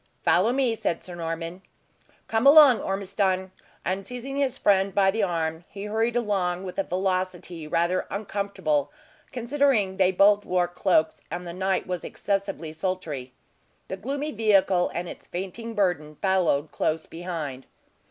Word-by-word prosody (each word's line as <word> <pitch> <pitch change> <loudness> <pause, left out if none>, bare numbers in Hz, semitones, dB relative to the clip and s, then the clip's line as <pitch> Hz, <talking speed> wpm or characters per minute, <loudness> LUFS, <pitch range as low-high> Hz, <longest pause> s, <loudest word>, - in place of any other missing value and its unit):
"Follow 195 +7 +4
me," 255 -2 +1
said 175 -6 -2
Sir 180 - -8
Norman. 165 +1 -5 0.7
"Come 225 +4 +2
along, 285 -5 +8
Ormiston." 195 -1 -1 0.3
And 190 +1 -1
seizing 250 +5 -6
his 275 -3 0
friend 195 -1 +2
by 195 -1 +4
the 220 +2 -1
arm, 165 -3 -1
he 200 0 -8
hurried 225 +3 0
along 190 -6 0
with 185 0 -5
a - - +2
velocity 185 -3 -2
rather 170 +4 0
uncomfortable, 200 -8 -1 0.4
considering 245 -6 +1
they 190 -1 +4
both 205 +2 +5
wore 180 -1 +1
cloaks, 175 -2 +1
and 175 +2 -5
the 170 - -6
night 190 +1 0
was 180 -2 -4
excessively 195 -5 -3
sultry. 160 -7 -4 0.6
The - - -2
gloomy 280 +8 -3
vehicle 195 -5 +3
and 175 +1 -3
its - - -10
fainting 195 +6 -6
burden 165 -7 0
followed 175 -6 +1
close 160 0 -1
behind. 165 -6 -6
190 Hz, 145 wpm, -26 LUFS, 175-210 Hz, 0.7 s, along